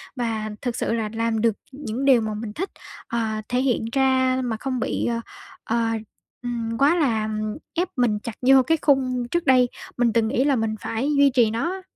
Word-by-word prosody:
và 225 -3 -2
thực 245 -2 -2
sự - - -1
là 220 -2 -1
làm 225 -1 0
được 230 -2 +3 0.2
những 265 -1 -4
điều 255 -4 +6
mà 215 -1 -2
mình 210 0 -5
thích, 380 - -3 0.4
ờ, 235 - -2 0.3
thể 250 +1 +1
hiện 250 -4 +1
ra 260 -1 +2
mà 230 -3 -2
không 255 +2 -3
bị, - - -1
ờ, 235 -1 0 0.4
ờ, 230 0 0 0.6
ừm, 230 -2 -3
quá 290 +5 +4
là, 235 -10 +1
ừm, 215 0 -3 0.2
ép 355 +3 0
mình 235 -5 +1
chặt 220 +1 -7
vô 265 +1 +6
cái 325 +3 +2
khung 255 -4 +2
trước 345 0 0
đây 250 -2 +5 0.3
mình 240 -2 +2
từng 230 -2 +2
nghĩ 250 +4 +1
là 280 -1 +3
mình 225 -2 -1
phải 245 +6 -1
duy 280 0 +6
trì 235 -4 +4
nó 235 +11 -1
á. 380 0 -6
245 Hz, 210 wpm, -23 LUFS, 225-265 Hz, 0.6 s, điều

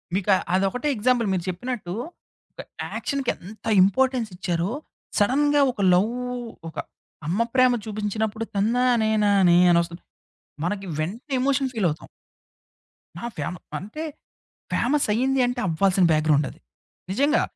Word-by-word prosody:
మీకు 200 +1 -1 0.3
అదొకటే 195 +10 0
ఎగ్జాంపుల్ 235 0 +2
మీరు 175 -2 -1
చెప్పినట్టు 195 -1 -4 0.6
ఒక - - -9 0.3
యాక్షన్‌కి 275 -3 -2
ఎంత 205 +5 -13 0.2
ఇంపార్టెన్స్ 250 +3 +2
ఇచ్చారో, 175 +2 -1 0.5
సడన్‌గా 290 +7 +3
ఒక 210 - -6
లవ్ 200 +6 +3 0.6
ఒక - - -15 0.5
అమ్మ 185 +7 0
ప్రేమ 255 -1 +5
చూపించినప్పుడు 215 +1 -2
తన్నానే 230 +1 +2
నానే 190 -4 +5
అని 170 - +5
వస్తుంది. 170 +1 -10 0.6
మనకి 195 +2 -2
వెంటనే 225 - -4
ఎమోషన్ 270 0 +1
ఫీలవుతాం. 175 -8 -1 1.1
నా 235 - -6
ఫేమ 150 +5 -3 0.2
అంటే 215 - -6 0.7
ఫేమస్ 275 +2 +1
అయ్యింది 265 +3 +1
అంటే 245 0 -2
అవ్వాల్సిన 185 +2 +3
బ్యాక్గ్రౌండ్ 155 -2 +3
అది. - - -15 0.5
నిజంగా 285 +9 +2
215 Hz, 120 wpm, -24 LUFS, 185-255 Hz, 1.1 s, ప్రేమ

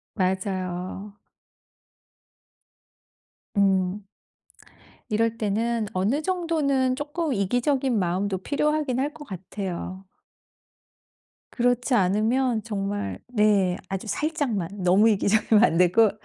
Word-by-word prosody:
맞아요. 185 0 -3 2.4
음. 195 0 +2 1.1
이럴 230 +1 +1
때는 225 +1 -1
어느 205 +11 0
정도는 305 -8 0
쪼끔 295 +2 -2
이기적인 245 +5 +1
마음도 190 +2 -1
필요하긴 290 +4 0
할 285 +2 -1
것 295 - -11
같아요. 190 -1 -6 1.5
그렇지 245 +1 +1
않으면 220 +4 +2
정말 200 - -3
네 210 -6 +2
아주 195 +2 -4
살짝만. 215 - -2
너무 190 +5 +5
이기적이면 210 +1 +3
안 165 - +2
되고 180 +5 +5
210 Hz, 205 characters per minute, -25 LUFS, 190-255 Hz, 2.4 s, 너무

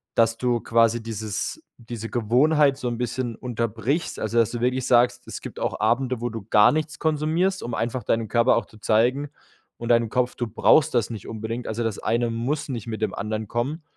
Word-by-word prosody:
dass 115 0 +3
du 120 -1 +1
quasi 115 0 +2
dieses 110 - -4
diese 115 -2 -7
Gewohnheit 135 +5 +3
so 130 - -4
'n 120 - -3
bisschen 120 -1 -3
unterbrichst, 120 - -2
also 110 +2 -2
dass 115 -1 +3
du 120 - -4
wirklich 125 +1 0
sagst, 120 0 +3
es - - -6
gibt - - -8
auch - - -2
Abende, 125 +3 +1
wo 120 - -1
du 110 -3 -7
gar 105 0 +6
nichts 155 0 -2
konsumierst, 160 +5 0
um 120 - -5
einfach 120 +2 -2
deinem 115 +1 0
Körper 120 +4 +3
auch 115 - -1
zu 110 - -18
zeigen 125 +7 +2 0.5
und 115 - -6
deinem 115 -1 +3
Kopf: 125 +1 0
Du 120 - -3
brauchst 130 +6 +4
das 115 -2 +2
nicht 110 -4 -7
unbedingt. 115 +2 -5
Also 115 +2 -2
das 115 -3 -2
eine 120 0 0
muss 125 +7 -2
nicht 120 -4 -5
mit 110 -1 -5
dem 110 -3 -1
anderen 110 +1 -3
kommen. 135 - -3
120 Hz, 205 wpm, -24 LUFS, 115-130 Hz, 0.5 s, gar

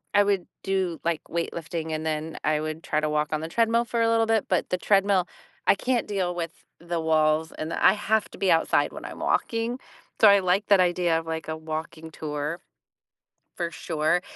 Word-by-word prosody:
I 205 - +6
would 200 -3 0 0.2
do, 190 -4 -1
like, 165 -2 0
weight 170 0 -2
lifting, 165 -1 -4
and 155 0 -3
then 155 0 -3
I 155 0 +2
would 155 +1 -4
try 155 - 0
to 155 0 -1
walk 150 0 0
on 155 -1 -1
the 160 - -4
treadmill 230 +5 +2
for 235 0 -1
a 230 - +3
little 225 0 +3
bit, 225 -2 +1
but 180 - +1
the 180 - +2
treadmill 195 -2 +3 0.4
I - - +6
can't 250 +3 -1
deal 190 -4 -1
with 170 -1 -3 0.3
the 170 0 -3
walls, 160 0 +2
and 155 +1 -5
I - - +5
have 215 +1 0
to - - -11
be 195 - +2
outside 165 - +2
when - - -9
I'm - - -8
walking. 230 +2 0 0.4
So 220 - +9
I 200 0 +7
like 190 +2 +1
that 200 -2 +5
idea 175 -2 +2
of, 165 - -9
like, 160 0 -4
a 160 - -3
walking 160 +1 -6
tour 150 +2 -4 1.0
for 170 -2 -1
sure, 165 +1 0
170 Hz, 210 wpm, -26 LUFS, 160-200 Hz, 1.0 s, So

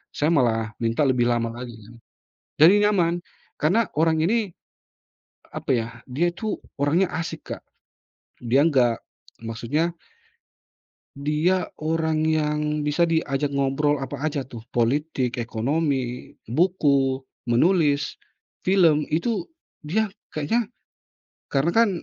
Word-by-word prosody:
saya 150 - +1
malah 115 -6 +2
minta 115 +6 +1
lebih 125 -3 +2
lama 120 -1 +1
lagi 120 -1 -7
kan, 115 +3 -14 0.7
jadi 165 +5 +9 0.2
nyaman. 175 -4 +1 0.4
Karena 190 +8 +2
orang 160 0 +3
ini, 205 +3 +1 1.0
apa - - -3
yah 115 -1 -2 0.2
dia 150 +7 +1
tuh 210 +4 -4 0.2
orangnya 160 +7 +3
asik, 165 -1 -5
Kak. - - -16 0.8
Dia 125 +4 +3
enggak, 125 -7 +2 0.4
maksudnya 135 +10 -1 1.2
dia 150 +6 +1 0.2
orang 160 0 0
yang 150 -1 +1 0.2
bisa 150 +4 +2
diajak 145 -3 0
ngobrol 140 +2 +2
apa 140 0 -6
aja 145 -1 -1
tuh. 125 -3 -10 0.2
Politik, 125 +1 0
ekonomi, 125 +2 -2
buku, 140 - +2 0.2
menulis, 145 +2 +2 0.5
film, 165 -6 +4
itu 180 +4 -1 0.3
dia 200 +7 -1 0.2
kayanya 210 +10 0 0.9
karena 140 +4 +2
kan 230 -1 +5
150 Hz, 110 wpm, -24 LUFS, 130-165 Hz, 1.2 s, jadi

